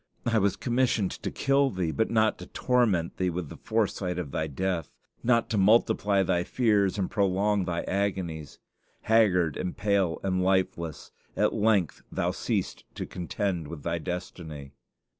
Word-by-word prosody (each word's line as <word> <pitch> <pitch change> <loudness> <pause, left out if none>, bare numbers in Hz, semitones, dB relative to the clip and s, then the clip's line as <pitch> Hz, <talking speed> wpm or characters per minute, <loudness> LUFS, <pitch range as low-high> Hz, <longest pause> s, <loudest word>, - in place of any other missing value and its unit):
I 115 -2 +3
was 100 -1 +2
commissioned 120 -3 +1
to - - -5
kill 140 0 +2
thee, 90 -7 -2
but 110 +6 0
not 110 -1 +2
to - - -9
torment 110 -10 +1
thee 90 -1 +1
with 85 -3 -4
the - - -9
foresight 100 -5 -1
of 80 -6 -4
thy 80 - -1
death; 85 +2 -2 0.3
not 115 -1 +3
to 105 - +1
multiply 100 -1 +3
thy 90 -1 +1
fears 105 -3 +2
and 95 -2 0
prolong 100 0 +1
thy 85 -1 -2
agonies. 95 -6 -2 0.4
Haggard 90 -9 +3
and 90 - -4
pale 100 -4 +1
and 95 -1 0
lifeless, 90 -4 -1 0.3
at - - +2
length 105 -6 +1
thou - - 0
ceasedst - - -2
to - - -4
contend 90 -2 -3
with 75 -2 -8
thy 85 0 -1
destiny. 80 -5 -6
95 Hz, 160 wpm, -27 LUFS, 85-105 Hz, 0.4 s, I